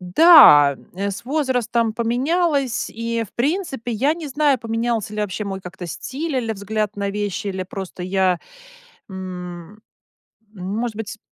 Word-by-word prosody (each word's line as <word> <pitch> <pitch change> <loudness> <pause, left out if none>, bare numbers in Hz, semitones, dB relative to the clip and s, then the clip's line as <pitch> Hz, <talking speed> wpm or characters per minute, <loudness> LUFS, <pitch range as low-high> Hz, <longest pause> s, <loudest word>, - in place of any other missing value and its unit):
Да, 180 - +8 0.2
м, 200 +2 -2
с 195 - -7
возрастом 245 -5 0
поменялось, 265 +4 0
и 230 0 -2
в - - -23
принципе, 270 - -2
я 270 +8 +1
не 325 -3 -7
знаю 285 -1 +2
поменялся 230 -2 -2
ли 210 - -2
вообще 210 0 -3
мой 195 -1 -5
как-то 180 -1 -8
стиль 280 - -4
или 230 -3 -1
взгляд 210 0 -3
на 200 0 -2
вещи 205 0 -3
или 190 -1 -3
просто 190 -1 -7
я, 185 -1 +1 0.7
м 185 0 -8 0.7
может 210 +4 -4
быть 220 0 -6
220 Hz, 145 wpm, -21 LUFS, 190-250 Hz, 0.7 s, Да